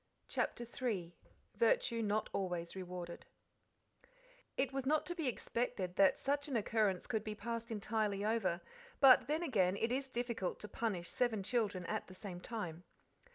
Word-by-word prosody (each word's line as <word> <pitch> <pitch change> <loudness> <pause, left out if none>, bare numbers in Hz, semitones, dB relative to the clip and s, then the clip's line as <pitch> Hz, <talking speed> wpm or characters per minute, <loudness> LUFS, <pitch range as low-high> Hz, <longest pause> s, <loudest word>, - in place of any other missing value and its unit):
CHAPTER 240 - -1
III 215 -8 -2 0.4
Virtue 470 - +3
Not 215 0 +1
Always 175 -3 -2
Rewarded 180 -2 -6 1.3
It 265 -1 +1
was 270 0 -1
not 310 +1 +3
to 350 - -1
be 325 -5 -2
expected 230 -7 -1
that 195 -1 +5
such 285 +2 0
an 275 - -2
occurrence 210 -4 +2
could 220 -4 -1
be 215 -1 -4
passed 230 +1 -4
entirely 210 -2 0
over, 195 -6 +1 0.4
but 255 -2 +8
then 310 +4 +1
again 200 - +2
it 225 +3 0
is 270 +1 -1
difficult 235 -6 -2
to 210 - -5
punish 200 -5 -2
seven 225 -5 +1
children 205 -5 0
at - - -2
the 185 - -11
same 185 -2 -6
time. 180 -7 -4
220 Hz, 155 wpm, -37 LUFS, 185-250 Hz, 1.3 s, but